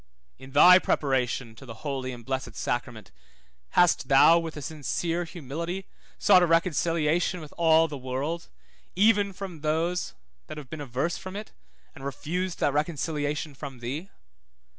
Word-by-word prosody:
In 130 0 -12
thy 180 +5 +8
preparation 125 -7 0
to - - -12
the 115 +1 -11
holy 135 -2 -3
and 120 -2 -10
blessed 130 -3 -4
sacrament, 120 -5 -4 0.7
hast 175 -1 +4
thou 150 +5 +7
with 165 -2 -6
a - - -5
sincere 165 +4 -2
humility 170 +4 -5 0.3
sought 190 -3 +6
a 175 - +3
reconciliation 165 +1 +1
with 155 -3 -11
all 165 -1 +4
the 145 -3 -7
world, 135 +7 -4 0.5
even 205 +1 +4
with 180 -6 -7
those 165 +4 -1 0.3
that 155 - -8
have 140 -4 -10
been 155 - -6
averse 140 +5 -2
from 185 +1 -8
it, 210 +1 -7 0.4
and 135 - -12
refused 170 +7 -3
that 145 - +2
reconciliation 150 -1 -2
from 135 -1 -8
thee? 135 +10 -5
155 Hz, 150 wpm, -27 LUFS, 135-170 Hz, 0.7 s, thy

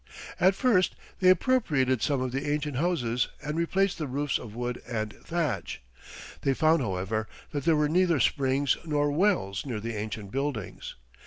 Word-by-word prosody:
At 190 +2 +5
first 200 -6 +3 0.2
they 185 - +5
appropriated 160 - +3
some 140 -4 +1
of 130 -1 -2
the 140 +3 -2
ancient 150 -2 -1
houses 125 -8 0 0.2
and 150 +1 -3
replaced 185 +3 +1
the 155 - -2
roofs 140 +2 -1
of 110 -2 -9
wood 120 0 -3
and 110 -3 -2
thatch. 155 - -3 0.6
They 135 -1 +1
found, 160 +1 +3
however, 105 +1 -2 0.2
that 145 -1 -3
there 165 -2 +5
were 150 0 +2
neither 170 -1 +3
springs 135 +1 +2
nor 145 -2 +1
wells 155 - +1
near 120 -6 -4
the 115 +2 -4
ancient 105 -1 -5
buildings. 135 -7 -4
145 Hz, 165 wpm, -28 LUFS, 120-165 Hz, 0.6 s, At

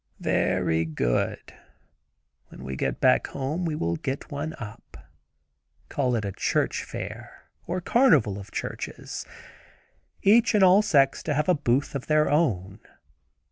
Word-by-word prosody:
"Very 80 0 +1
good; 75 -7 -2 0.9
when - - -12
we 65 0 -5
go - - -1
back 65 - +2
home 145 +6 -3
we 160 -2 -1
will 85 - -1
get 135 +1 -5
one 150 +2 -4
up; 115 +1 -10 0.9
call 130 -4 0
it 110 -3 -2
a 100 - -3
church - - -1
fair, - - -8 0.2
or 180 +2 -2
carnival 160 - +3
of 95 - -10
churches. - - -6 1.0
Each 225 +3 +5
and 205 - +5
all 190 +2 +7
sects 140 -10 +3
to 150 - -2
have 150 +4 0
a 180 - +5
booth 140 -3 0
of 140 -2 -5
their 155 -1 +3
own. 100 - 0
140 Hz, 140 wpm, -26 LUFS, 100-165 Hz, 1.0 s, all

